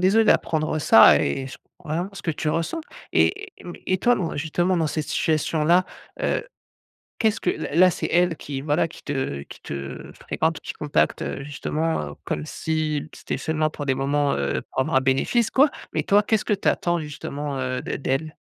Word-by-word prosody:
désolé 200 +5 +4
d'apprendre 155 -6 +2
ça 110 -6 +8
et 130 - -1
ch - - -9 0.3
vraiment 165 +5 -2
ce 185 - -9
que 165 - 0
tu 155 0 -2
ressens 165 - -1 0.3
et 405 +1 +2
mais 175 - -9
et 185 - +1
toi 245 +6 +4
dans, 180 -8 -3
justement, 175 +5 0
dans 165 -2 +1
cette 155 0 -2
situation 155 0 0
là, 175 +3 +5 0.4
heu, - - 0 0.7
qu'est-ce 220 -1 +2
que 180 - +1
là - - -4
là, 185 +1 +7
c'est - - -3
elle 175 0 +3
qui, 140 -3 -5
voilà, 150 +4 +1
qui - - -14
te 135 - -2
qui - - -12
te 70 -1 -6
fréquente, 160 +1 -1
qui - - -6
contacte, 150 -1 0
heu, 135 - -4
justement, 150 - -2
heu, - - -9
comme 75 - -3
si 155 - -2
c'était - - -4
seulement 155 -1 0
pour 145 -1 -6
des 135 - +2
moments, 140 +2 +1
heu, 70 0 -1
pour - - -4
avoir 130 - 0
un - - +6
bénéfice, 135 - +2
quoi. 280 +3 +5 0.2
Mais - - 0
toi, 205 +1 +4
qu'est-ce 220 0 +1
que - - 0
tu 200 - -2
attends 175 0 +1
justement, 145 -2 -5
heu, 130 -1 -2
d - - -4
d'elle? 140 +4 -2
155 Hz, 200 wpm, -24 LUFS, 140-175 Hz, 0.7 s, ça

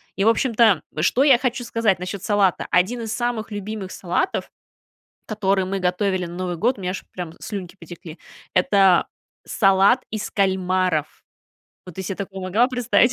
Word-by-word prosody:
И 195 - 0
в 225 - +5
общем-то, 230 -3 +3 0.2
что 245 - +3
я 265 -4 +6
хочу 250 -1 -2
сказать 230 -5 +1
насчет 185 +2 -6
салата: 200 -5 +1
1 215 +7 +1
из 220 -1 -5
самых 240 -2 -2
любимых 205 -1 -5
салатов, 180 - -2 0.8
который 195 -3 0
мы 195 +1 -2
готовили 185 0 0
на 170 - -9
Новый 180 -1 -3
год,- 235 +6 0
у - - -9
меня 180 0 -2
аж 185 - -6
прям 175 -3 -6
слюнки 195 -3 -6
потекли,- 165 -1 -11 0.4
это 190 -1 +4 0.4
салат 195 +5 +3
из 215 -1 -4
кальмаров. 185 -5 0 0.6
Вот 180 - -10
ты 190 - -4
се 190 +1 -4
такое 195 -1 -6
помогла 210 +7 +2
представить? 245 0 +2
195 Hz, 165 wpm, -22 LUFS, 185-225 Hz, 0.8 s, я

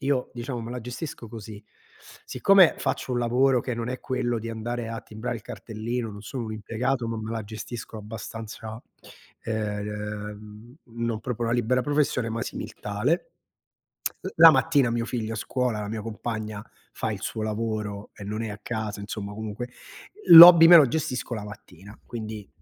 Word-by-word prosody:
io, 135 -2 0
diciamo, 120 0 -5
me 115 +1 -7
la 125 - -5
gestisco 120 0 -7
così: 110 -2 -9 0.6
siccome 195 -3 +5
faccio 135 -1 -2
un 120 - 0
lavoro 125 +2 +3
che 125 0 -4
non 115 +1 -4
è 130 - -5
quello 125 -2 -1
di 115 +1 -6
andare 115 +1 -4
a 115 0 -5
timbrare 110 +3 -5
il 110 - -11
cartellino, 115 +1 -5
non 100 0 -10
sono 125 +2 -5
un 110 - -5
impiegato, 115 +3 -2
ma 115 - -3
me 110 0 -5
la 115 -1 -3
gestisco 110 +1 -7
abbastanza, 110 +1 -8 0.6
ehm, 105 +1 -5
non 115 -2 -4
proprio 120 -1 -3
una 115 +1 0
libera 125 +2 +1
professione, 145 -5 0
ma 115 +1 -3
simil-tale. 105 - -3 0.9
L - - -4
la 165 0 +10
mattina 145 -6 +3
mio 115 0 -1
figlio 115 -2 -3
a - - -5
scuola, 125 0 -1
la 105 - -5
mia 110 0 -4
compagna 110 -1 -5 0.3
fa - - -3
il - - -6
suo 110 - -4
lavoro 105 -2 -3
e 100 - -10
non 105 +2 -4
è 115 - -3
a 105 - -7
casa, 110 -3 -4
insomma, 100 0 -6
comunque, 110 +3 -6 0.6
l'hobby 170 0 +12
me 175 - +11
lo 145 -6 +7
gestisco 130 -4 -2
la 105 - -5
mattina. 105 -1 -12
Quindi, 110 -3 -7
115 Hz, 170 wpm, -26 LUFS, 105-125 Hz, 0.9 s, l'hobby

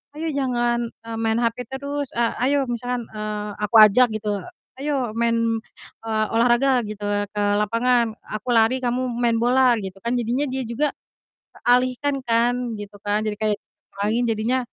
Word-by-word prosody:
"Ayo 320 +2 -3
jangan," 240 -3 0
eee, 230 0 -9
"main 225 +1 +1
hape 235 +1 -1
terus. 280 +1 -4
A 235 -1 0
ayo-" 275 +1 +2
Misalkan, 245 0 -3
eee, 210 -1 -5
aku 210 +2 -1
ajak 215 +4 +7
gitu, 205 -2 -3 0.3
"Ayo 270 -5 -2
main," 230 0 +2 0.7
eee, 220 -1 0
"olahraga," 245 +2 +3
gitu 210 -1 -7
ya, 205 0 0
"ke 210 - -4 0.2
lapangan. 230 +3 +2 0.2
Aku 245 +4 -3
lari 235 +3 +3
kamu 250 +1 0
main 235 -1 +1
bola." 245 0 +4
Gitu 190 -2 -6
kan, 235 - -1
jadinya 240 +4 0
dia 265 0 -2
juga 280 +6 0 0.6
teralihkan 255 +3 +1
kan 235 0 +2 0.2
gitu 205 0 -9
kan, 205 +1 -1
jadi 215 - -1
kayak 215 -1 +1 0.5
main, 225 +3 +1
jadinya 225 +3 0
235 Hz, 160 wpm, -23 LUFS, 215-255 Hz, 0.7 s, ajak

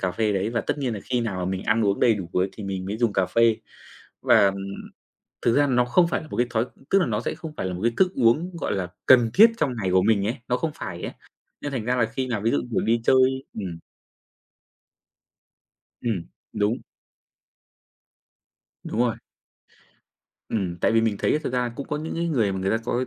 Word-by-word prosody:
cà 95 - 0
phê 105 +2 0
đấy 100 +3 -1
và 115 -1 0
tất - - -3
nhiên 130 -5 -1
là 105 - -6
khi 125 -1 0
nào 100 -5 -3
mà 90 - -2
mình 95 0 -3
ăn 110 0 +2
uống 100 0 +1
đầy 115 -2 +5
đủ 95 -4 -6
bữa 90 +1 +2
thì 110 - -9
mình 95 -1 -4
mới 100 +3 -3
dùng 120 -3 +2
cà 95 -2 +1
phê. 115 +3 +3 0.7
Và, 100 - +5
ừm, 95 0 0 0.9
thực 115 - +2
ra 145 0 +4
nó 125 -2 +2
không 170 +8 +3
phải 170 - -1
là 155 - -11
một - - -7
cái 120 - +2
thói 115 +1 0 0.2
tức 195 - +4
là 180 - +2
nó - - -1
sẽ - - -3
không 160 -2 -8
phải - - -2
là 95 - -2
một 90 - -6
cái 115 - +3
thức 185 -1 +3
uống, 150 +9 +2
gọi - - -2
là, 95 -2 -2 0.2
cần 120 -3 +6
thiết 225 +4 +8
trong 130 - 0
ngày 95 -5 -2
của 95 - +4
mình 100 0 +2
ấy, 115 +6 -1
nó 125 - +1
không 155 +5 -2
phải - - -6
ấy, - - -4 0.5
nên 145 - -4
thành 120 -5 -3
ra 125 +1 +1
là 120 - +2
khi 130 -1 -2
nào 110 -5 -2
ví 115 - +1
dụ, 145 - +2
kiểu, - - +1
đi 115 +1 +1
chơi 130 +1 +3
ừm. 90 -6 -5 2.2
Ừm. 105 -8 -2 0.3
Đúng. 105 +3 0 2.0
Đúng 110 - -3
rồi. 120 -2 +1 1.3
Ừm, 95 -6 -2
tại - - +2
vì 115 - +4
mình 110 -2 0
thấy - - +1
ấy - - +2
thực 155 - -5
ra 125 - +1
là 125 -1 0
cũng 140 - -5
có 150 - -1
những 155 +2 -5
cái 170 +1 -1
người 115 -11 +1
mà 95 - -3
người 95 +1 -1
ta 110 - +2
có 120 - -1
cái 130 +1 -1
115 Hz, 240 wpm, -24 LUFS, 100-130 Hz, 2.2 s, thiết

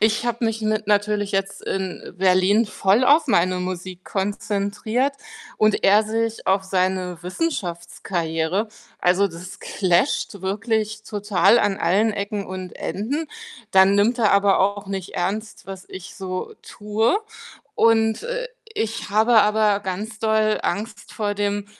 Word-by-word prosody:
Ich 215 +1 +2
habe 235 0 -1
mich 225 0 -1
mit 215 -1 -1
natürlich 205 0 +1
jetzt 195 0 -2
in, 190 -1 -3
äh, - - -9
Berlin 185 +4 +3
voll 205 +2 +2
auf 295 +4 +5
meine 185 -5 +2
Musik 185 0 -5
konzentriert 205 +6 -1 0.4
und 215 -1 +2
er 205 +2 +5
sich 225 +1 -2
auf 190 +1 +3
seine 185 -2 -1
Wissenschaftskarriere. 175 - -2 0.3
Also, 185 +3 +3
das 180 0 -10
clasht 190 +2 0
wirklich 215 +3 -2
total 205 0 +2
an 205 -3 +1
allen 205 +6 +2
Ecken 200 0 -3
und 185 -1 -7
Enden. 275 +11 -3 0.5
Dann 190 +1 +6
nimmt 225 +5 +2
er 215 - +4
aber 200 -1 +4
auch 200 +1 0
nicht 190 -2 -5
ernst, 210 +5 -3
was 190 -1 -8
ich 185 0 -9
so 185 -1 -5
tue 215 - 0 0.6
und, 225 -1 +3
äh, - - -3 0.3
ich 225 - -3
habe 220 +2 +5
aber 210 -1 +2
ganz 205 +4 -5
doll 220 -1 +2
Angst 220 +3 -4
vor 205 -2 -2
dem 205 0 -1
205 Hz, 140 wpm, -22 LUFS, 190-220 Hz, 0.6 s, Dann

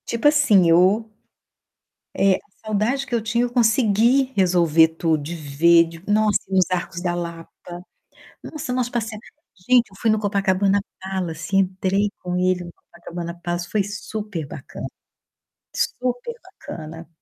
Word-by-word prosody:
Tipo 235 +5 +1
assim, 225 - +5
eu 190 +7 +4 1.1
é, 195 -1 +4
a - - -6 0.3
saudade 220 +6 0
que 275 - -10
eu 235 - +1
tinha 225 +2 0
eu 245 - -2
consegui 235 +2 +3
resolver 170 -4 +4
tudo, 160 -1 0
de 165 +4 -5
ver, 165 +3 +4
de 165 +1 -12
nossa, 215 0 +3
ir - - -6
nos 185 -1 +5
Arcos 175 0 -3
da 175 -1 -1
Lapa. 170 -1 -6 0.9
Nossa, 295 -5 -6
nós 250 -1 0
passeamo 225 -3 -4 0.5
gente, 250 -1 +5
eu 195 - -17
fui 225 - +2
no 215 - +2
Copacabana 200 -1 +1 0.2
Palace, 190 -1 -3
entrei 195 +1 +1
com 180 0 -3
ele 180 0 +1
no 170 - -10
Copacabana 170 0 -9
Palace, 175 0 -3
foi 210 - +1
superbacana, 200 -8 -6 0.9
superbacana. 245 - -5
195 Hz, 140 wpm, -22 LUFS, 170-225 Hz, 1.1 s, assim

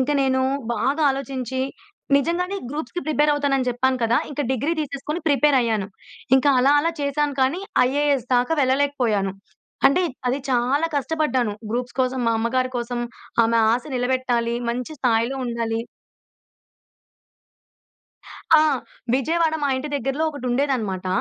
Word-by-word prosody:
ఇంకా 265 +3 +1
నేను 260 -1 +1 0.3
బాగా 270 +8 0
ఆలోచించి, 265 -2 -3 0.6
నిజంగానే 355 +6 -1
గ్రూప్స్‌కి 300 +3 -4
ప్రిపేర్ 300 0 +3
అవుతాన‌న్ని 275 -3 0
చెప్పాను 255 +2 0
కదా! 230 +1 +3
ఇంక 290 - -4
డిగ్రీ 280 +6 0
తీసేసుకొని 300 +3 -4
ప్రిపేరయ్యాను. 255 -8 +2 0.5
ఇంకా 280 +2 +3
అలా, 270 +3 +4
అలా 335 +2 0
చేశాను 285 0 0
కానీ, 275 +8 +1 0.3
ఐఏఎస్ 280 -2 +1
దాకా 245 +5 +1
వెళ్ళలేకపోయాను. 255 -7 +1 0.5
అంటే, 280 +7 +3 0.3
అది 255 +3 0
చాలా 260 +5 +2
కష్టపడ్డాను 280 -6 0 0.2
గ్రూప్స్ 245 +1 -3
కోసం, 255 0 0
మా 230 - +3
అమ్మగారి 255 +3 0
కోసం 240 0 -3 0.4
ఆమె 230 +1 +2
ఆశ 240 +1 0
నిలబెట్టాలి, 245 -2 0
మంచి 250 +5 -3
స్థాయిలో 235 +1 +1
ఉండాలి. 230 -1 -2 2.8
ఆ! - - +6 0.5
విజయవాడ 320 +4 +1
మా 285 - +2
ఇంటి 265 +3 -4
దగ్గరలో 275 +3 -1
ఒకటుండేదన్నమాట. 250 -8 -1
260 Hz, 120 wpm, -22 LUFS, 240-285 Hz, 2.8 s, ఆ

